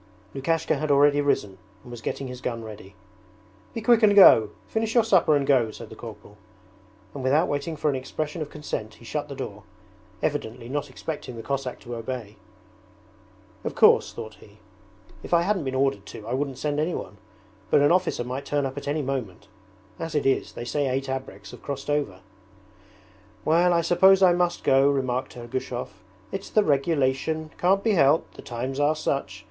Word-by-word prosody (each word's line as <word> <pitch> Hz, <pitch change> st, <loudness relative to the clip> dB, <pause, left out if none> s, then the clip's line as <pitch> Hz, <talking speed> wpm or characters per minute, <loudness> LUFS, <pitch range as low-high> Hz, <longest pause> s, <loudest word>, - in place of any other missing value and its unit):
Lukashka 155 Hz, +3 st, 0 dB
had 155 Hz, +1 st, -2 dB
already 145 Hz, +1 st, +5 dB
risen 105 Hz, -9 st, 0 dB, 0.2 s
and 120 Hz, -, -12 dB
was 120 Hz, -1 st, -8 dB
getting 135 Hz, +4 st, -4 dB
his 125 Hz, 0 st, -8 dB
gun 115 Hz, -2 st, -3 dB
ready. 105 Hz, -3 st, -11 dB, 0.8 s
'Be 230 Hz, -, -3 dB
quick 235 Hz, +1 st, +4 dB
and 205 Hz, -2 st, +5 dB
go! 115 Hz, -, +8 dB, 0.2 s
Finish 220 Hz, +1 st, -2 dB
your 235 Hz, -, +6 dB
supper 185 Hz, -8 st, +4 dB
and 140 Hz, -1 st, +1 dB
go!' 130 Hz, -5 st, +3 dB
said 110 Hz, +1 st, -10 dB
the -, -, -9 dB
corporal; 105 Hz, -2 st, -11 dB, 0.8 s
and 140 Hz, -, -6 dB
without 145 Hz, +6 st, +3 dB
waiting 145 Hz, +3 st, -2 dB
for 150 Hz, -, -2 dB
an 145 Hz, -, +2 dB
expression 150 Hz, +5 st, -4 dB
of 150 Hz, -, -4 dB
consent 110 Hz, -8 st, -5 dB
he 115 Hz, -, -16 dB
shut 150 Hz, +4 st, -4 dB
the 140 Hz, -, -6 dB
door, 105 Hz, -5 st, -6 dB, 0.6 s
evidently 125 Hz, -5 st, -2 dB
not 145 Hz, +2 st, -3 dB
expecting 130 Hz, -2 st, -6 dB
the 115 Hz, -, -7 dB
Cossack 135 Hz, -1 st, -3 dB
to 120 Hz, 0 st, -7 dB
obey. 115 Hz, -3 st, -6 dB, 1.3 s
'Of -, -, -4 dB
course,' -, -, +5 dB
thought 110 Hz, -2 st, -8 dB
he, 105 Hz, 0 st, -17 dB, 0.6 s
'if -, -, 0 dB
I 170 Hz, -, +4 dB
hadn't 190 Hz, -4 st, 0 dB
been 130 Hz, 0 st, -2 dB
ordered 130 Hz, -7 st, 0 dB
to 105 Hz, -, -9 dB
I 120 Hz, -, -3 dB
wouldn't 135 Hz, -1 st, -2 dB
send 150 Hz, -1 st, -1 dB
anyone, 155 Hz, -, -3 dB, 0.5 s
but 140 Hz, -, +4 dB
an 145 Hz, -, +4 dB
officer 180 Hz, -8 st, +1 dB
might 130 Hz, +3 st, -5 dB
turn 145 Hz, -1 st, 0 dB
up 135 Hz, +1 st, -5 dB
at 140 Hz, -, -11 dB
any 150 Hz, +1 st, -1 dB
moment. 110 Hz, -8 st, -4 dB, 0.5 s
As 165 Hz, -1 st, -5 dB
it 150 Hz, -, +1 dB
is, 135 Hz, -, +1 dB
they 120 Hz, -, -6 dB
say 140 Hz, +3 st, -1 dB
eight 135 Hz, +1 st, -2 dB
abreks 135 Hz, 0 st, -6 dB
have -, -, -12 dB
crossed 140 Hz, +1 st, -4 dB
over.' 125 Hz, -11 st, -1 dB, 1.2 s
'Well, 170 Hz, +3 st, +4 dB
I 170 Hz, -1 st, +3 dB
suppose 190 Hz, +3 st, +5 dB
I 180 Hz, -1 st, +7 dB
must 175 Hz, 0 st, 0 dB
go,' 135 Hz, +1 st, +4 dB
remarked 130 Hz, -3 st, -1 dB
Ergushov, 120 Hz, +1 st, -4 dB, 0.4 s
'it's 195 Hz, -, -5 dB
the 215 Hz, -, +3 dB
regulation. 150 Hz, 0 st, 0 dB
Can't 195 Hz, +2 st, +3 dB
be 225 Hz, -, +2 dB
helped! 155 Hz, -4 st, +3 dB
The -, -, -11 dB
times 130 Hz, +1 st, -4 dB
are 145 Hz, +2 st, +3 dB
such. 140 Hz, -9 st, -2 dB
140 Hz, 185 wpm, -25 LUFS, 120-155 Hz, 1.3 s, go